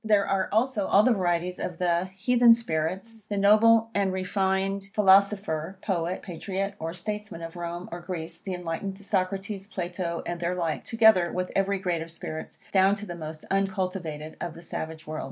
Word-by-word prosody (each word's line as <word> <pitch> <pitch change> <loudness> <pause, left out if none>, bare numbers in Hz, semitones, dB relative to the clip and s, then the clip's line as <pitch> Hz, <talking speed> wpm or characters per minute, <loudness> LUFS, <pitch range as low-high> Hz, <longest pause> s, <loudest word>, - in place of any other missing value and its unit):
There 210 -2 +3
are 190 -1 0
also 220 -2 +1
all 205 - +5
the 250 - +5
varieties 180 -2 0
of 180 - -4
the 175 0 +1
heathen 240 +3 +6
spirits; 190 +2 -3
the 205 - -2
noble 225 +3 +5
and 200 -2 +1
refined 190 +1 0
philosopher, 195 -4 +3
poet, 180 -2 -1
patriot, 195 +3 -3
or 160 +1 -3
statesman 205 -1 -5
of 165 +1 -7
Rome 175 +1 -5
or 175 - -5
Greece; 170 -2 -6
the 190 -2 -4
enlightened 180 +3 -4
Socrates, 195 0 -2
Plato, 175 -3 -3
and 175 0 -3
their 175 +1 -1
like; 165 -3 -2
together 220 -7 +5
with 180 0 -2
every 195 0 +2
grade 180 -3 -1
of 165 - -6
spirits, 160 -1 -7
down 195 +1 +5
to 210 0 -7
the 175 - -6
most 155 -2 -8
uncultivated 185 -6 -2
of 170 -2 -4
the 170 - -11
savage 160 -1 -6
world. 155 0 -5
185 Hz, 175 wpm, -27 LUFS, 170-200 Hz, -, heathen